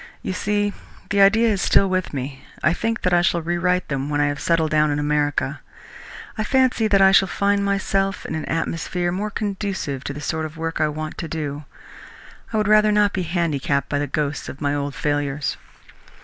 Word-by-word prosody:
"You - - -2
see, 205 +1 0 0.4
the 200 -1 +3
idea 220 +4 +5
is 200 -3 0
still 195 - +4
with 185 -1 -1
me. 135 -1 -5 0.2
I 155 - +4
think 225 +5 -2
that 180 - +2
I 175 - +5
shall 175 -2 +1
rewrite 175 +2 0
them 140 0 -2
when 145 0 0
I 145 0 +3
have 145 0 -4
settled 165 -2 +1
down 155 0 +3
in 145 - 0
America. 145 0 0 0.8
I - - +1
fancy 255 -2 +2
that 195 -2 +4
I 190 - +7
shall 195 0 +5
find 200 +2 +1
myself 195 0 0
in - - -4
an 160 -1 -3
atmosphere 165 +2 -2
more 200 +4 -2
conducive 195 - -3
to - - -3
the 145 - -7
sort 160 +1 -2
of 155 +1 -14
work 165 0 -3
I 155 - +3
want 155 +1 -5
to 165 - -4
do. 150 -2 -4 0.9
I 220 - -1
would 210 -1 +1
rather 215 0 +5
not 210 -1 +3
be 190 - -1
handicapped 155 -5 -1
by 145 - 0
the 145 - -1
ghosts 150 +1 -2
of 135 - -9
my 145 -1 0
old 145 -1 -3
failures." 145 -1 -1
170 Hz, 205 wpm, -22 LUFS, 145-200 Hz, 0.9 s, I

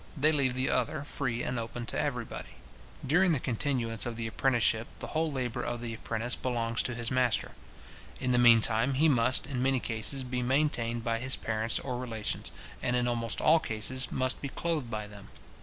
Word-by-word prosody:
They 150 +3 +4
leave 135 -4 +1
the 130 +1 0
other 125 +2 0
free 130 -5 -3
and 125 - -2
open 115 +1 -5
to - - -1
every - - -2
body. - - -9 0.5
During 175 +5 +3
the 145 - 0
continuance 120 -2 -1
of 120 - -4
the 115 0 -4
apprenticeship, 115 -1 +1
the - - -5
whole 160 0 0
labour 125 -3 -3
of 120 0 -3
the 115 -1 -5
apprentice 115 +2 -1
belongs 115 -2 0
to 120 - -1
his 115 -1 -2
master. 125 -3 +1 0.7
In 125 - -1
the 125 - +3
meantime 115 +2 +5
he 155 +4 +4
must, 130 -3 +3
in 130 -2 -3
many 135 0 +2
cases, 120 +4 0
be 125 0 -3
maintained 120 -3 0
by 115 0 -1
his 130 +2 +3
parents 110 0 -1
or 125 -2 -4
relations, 115 -4 -4 0.3
and, 125 - 0
in 125 0 +1
almost 115 -2 -1
all 160 +2 +5
cases, 125 +2 +2
must 130 0 +1
be 140 - -4
clothed 155 -5 -2
by 110 -2 -4
them. 105 -1 -12
125 Hz, 195 wpm, -29 LUFS, 115-130 Hz, 0.7 s, meantime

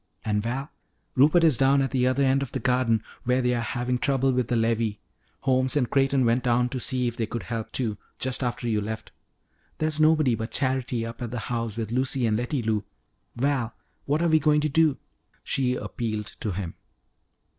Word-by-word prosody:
And, 105 -1 +1
Val, 130 +7 -3 0.4
Rupert 155 +6 +5
is 155 -7 +5
down 135 +1 +4
at 135 -1 0
the 125 -2 +2
other 130 +2 +2
end 135 0 +3
of 140 - -5
the 130 - -1
garden 120 -3 +2 0.2
where 125 +1 +2
they 125 -1 +1
are 120 - 0
having 125 +2 -1
trouble 135 0 +2
with 125 -2 0
the 120 - 0
levee. 115 -2 0 0.4
Holmes 130 +1 +2
and 125 -4 +2
Creighton 135 -1 +3
went 120 +2 +2
down 125 0 +2
to 130 - -3
see 125 0 0
if 120 - -3
they 115 -2 -2
could 120 - -4
help, 115 -2 -4
too, 110 -5 -2 0.2
just 130 +1 -1
after 120 0 -2
you 110 -2 +1
left. 110 +1 -5 0.7
There's 155 -1 0
nobody 155 -4 +4
but 110 +1 -3
Charity 130 -3 -1
up 115 +2 -8
at 120 - -3
the 120 - -4 0.2
house 115 -2 -2
with 110 -2 -3
Lucy 130 0 +1
and 110 -2 +2
Letty 120 +3 -1
Lou. 110 -2 0 0.5
Val, 130 -2 0 0.3
what 150 +4 +1
are 170 - +3
we 160 0 +5
going 150 0 +3
to 155 - 0
do?" 155 -2 +3 0.5
she 125 -2 0
appealed 110 -4 -4
to 110 - -2
him. 90 -2 -4
125 Hz, 205 wpm, -26 LUFS, 115-135 Hz, 0.7 s, Rupert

